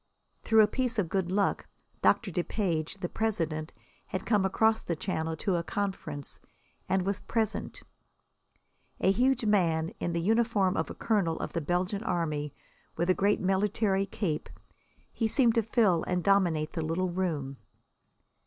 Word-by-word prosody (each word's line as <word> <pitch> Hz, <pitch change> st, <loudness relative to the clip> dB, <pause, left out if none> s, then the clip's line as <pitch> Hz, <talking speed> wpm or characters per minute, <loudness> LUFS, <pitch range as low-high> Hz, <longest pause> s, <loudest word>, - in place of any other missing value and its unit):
Through 220 Hz, -1 st, +5 dB
a -, -, +4 dB
piece 250 Hz, +1 st, -1 dB
of 190 Hz, -6 st, 0 dB
good 185 Hz, -1 st, -1 dB
luck 200 Hz, +1 st, 0 dB, 0.3 s
Doctor 210 Hz, -5 st, +3 dB
Depage, 175 Hz, 0 st, -2 dB
the 175 Hz, -, -1 dB
president, 165 Hz, -8 st, -2 dB, 0.4 s
had 185 Hz, -, -4 dB
come 210 Hz, -4 st, +2 dB
across 220 Hz, +3 st, +2 dB
the 170 Hz, -, -2 dB
Channel 160 Hz, -2 st, -2 dB
to 180 Hz, +2 st, 0 dB
a 170 Hz, -, -2 dB
conference, 165 Hz, -5 st, -4 dB, 0.5 s
and 190 Hz, -1 st, +2 dB
was 200 Hz, +1 st, -1 dB
present. 220 Hz, -2 st, -2 dB, 1.2 s
A 190 Hz, -, +4 dB
huge 250 Hz, +3 st, +2 dB
man, 165 Hz, -6 st, +2 dB
in 170 Hz, -, -2 dB
the 170 Hz, -, 0 dB
uniform 210 Hz, -1 st, +2 dB
of -, -, -1 dB
a -, -, -7 dB
colonel 195 Hz, -8 st, 0 dB
of -, -, -5 dB
the 170 Hz, -, -1 dB
Belgian 180 Hz, +6 st, -1 dB
Army, 155 Hz, -, -1 dB, 0.5 s
with 170 Hz, +3 st, +2 dB
a -, -, +5 dB
great 200 Hz, +3 st, +1 dB
military 195 Hz, +1 st, +1 dB
cape, 175 Hz, -6 st, -3 dB, 0.6 s
he 225 Hz, -, 0 dB
seemed 235 Hz, 0 st, +3 dB
to 230 Hz, -, +3 dB
fill 210 Hz, -6 st, +2 dB
and 180 Hz, -1 st, 0 dB
dominate 175 Hz, -6 st, +2 dB
the 165 Hz, -, -2 dB
little 165 Hz, +4 st, -1 dB
room. 155 Hz, -7 st, -2 dB
190 Hz, 155 wpm, -29 LUFS, 165-210 Hz, 1.2 s, Through